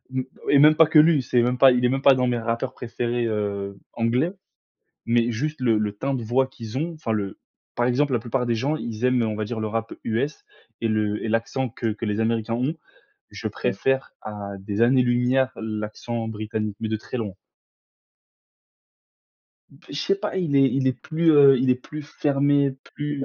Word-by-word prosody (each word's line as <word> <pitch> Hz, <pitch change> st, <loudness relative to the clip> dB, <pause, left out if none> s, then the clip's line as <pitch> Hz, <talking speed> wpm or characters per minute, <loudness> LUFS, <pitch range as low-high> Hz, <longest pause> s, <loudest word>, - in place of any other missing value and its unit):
m 130 Hz, -, 0 dB, 0.3 s
et 140 Hz, -, +6 dB
même 150 Hz, +2 st, +7 dB
pas 160 Hz, 0 st, +6 dB
que 155 Hz, -, +3 dB
lui, 155 Hz, -2 st, +5 dB
c'est 120 Hz, -1 st, +2 dB
même 125 Hz, +1 st, 0 dB
pas, 135 Hz, -, +8 dB
il 125 Hz, 0 st, +2 dB
est -, -, +4 dB
même 135 Hz, +1 st, -1 dB
pas 140 Hz, -1 st, +6 dB
dans 125 Hz, 0 st, +1 dB
mes 120 Hz, -1 st, 0 dB
rappeurs 115 Hz, +3 st, -2 dB
préférés, 120 Hz, 0 st, -2 dB
heu, 100 Hz, -2 st, -3 dB, 0.2 s
anglais, 120 Hz, +8 st, +1 dB, 0.8 s
mais 115 Hz, 0 st, +2 dB
juste 150 Hz, +6 st, -3 dB
le 115 Hz, -4 st, +3 dB
le 105 Hz, -1 st, -1 dB
teint 135 Hz, +7 st, -3 dB
de 120 Hz, -3 st, -3 dB
voix 130 Hz, +4 st, +1 dB
qu'ils 120 Hz, -2 st, -7 dB
ont 165 Hz, +3 st, -3 dB
enfin 155 Hz, -8 st, -3 dB
le, 100 Hz, -3 st, -3 dB, 0.4 s
par 120 Hz, -, +1 dB
exemple, 135 Hz, +3 st, +1 dB
la 120 Hz, -, +2 dB
plupart 125 Hz, +2 st, -2 dB
des 120 Hz, -1 st, +1 dB
gens, 140 Hz, +7 st, 0 dB
ils 115 Hz, -5 st, -5 dB
aiment, 125 Hz, -1 st, +3 dB
heu, -, -, +1 dB
on 105 Hz, -, -3 dB
va 110 Hz, -, -2 dB
dire 110 Hz, +1 st, -4 dB
le 110 Hz, -, -2 dB
rap 115 Hz, +1 st, -3 dB
US 120 Hz, +7 st, -2 dB, 0.4 s
et 115 Hz, -, 0 dB
le 105 Hz, -1 st, 0 dB
et -, -, -2 dB
l'accent 115 Hz, +4 st, -1 dB
que 115 Hz, 0 st, -4 dB
que 110 Hz, -, -6 dB
les 105 Hz, 0 st, -1 dB
Américains 115 Hz, 0 st, 0 dB
ont, 130 Hz, +6 st, -1 dB, 0.6 s
je -, -, -5 dB
préfère 135 Hz, 0 st, -1 dB
à 100 Hz, -2 st, -7 dB
des 100 Hz, +2 st, -3 dB
années-lumière 125 Hz, +1 st, +3 dB
l'accent 110 Hz, +1 st, -4 dB
britannique, 110 Hz, -1 st, -4 dB
mais 110 Hz, -, -2 dB
de 110 Hz, -, -1 dB
très 110 Hz, -, -8 dB
loin. 110 Hz, -4 st, -3 dB, 2.5 s
B -, -, -25 dB
je -, -, -3 dB
sais 195 Hz, -, +2 dB
pas, 205 Hz, 0 st, -4 dB
il 165 Hz, -7 st, 0 dB
est 135 Hz, -1 st, +6 dB
il 135 Hz, 0 st, 0 dB
est -, -, +2 dB
plus, 160 Hz, +5 st, 0 dB
heu, 140 Hz, -2 st, +7 dB
il 130 Hz, +1 st, +2 dB
est -, -, +5 dB
plus 150 Hz, +4 st, -8 dB
fermé, 140 Hz, -1 st, +1 dB, 0.2 s
plus 145 Hz, -2 st, -3 dB
120 Hz, 205 wpm, -24 LUFS, 110-135 Hz, 2.5 s, pas